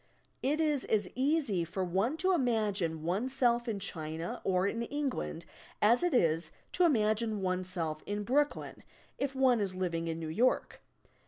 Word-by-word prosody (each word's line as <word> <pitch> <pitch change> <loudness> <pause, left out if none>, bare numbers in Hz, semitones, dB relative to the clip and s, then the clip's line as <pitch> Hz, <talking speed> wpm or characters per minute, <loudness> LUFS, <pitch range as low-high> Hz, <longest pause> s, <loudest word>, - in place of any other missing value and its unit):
It 290 +4 +1
is 300 -4 +1
as 210 -3 +1
easy 265 - +1
for 185 +3 -3
one 195 - 0
to 370 +3 +2
imagine 210 - 0
oneself 240 +6 +1
in 220 -3 -1
China 165 -3 -5
or 185 0 +2
in 230 +3 -1
England 260 - -3 0.3
as 230 +4 +5
it 355 0 +2
is 165 - +2 0.2
to 360 - +4
imagine 215 - +1
oneself 180 -4 -1
in 205 0 -2
Brooklyn, 285 +6 0 0.4
if 275 -1 -2
one 260 -3 +4
is 195 -3 -2
living 170 -3 -2
in 165 0 -3
New 160 - -4
York. 240 +11 +1
210 Hz, 155 wpm, -32 LUFS, 180-260 Hz, 0.4 s, as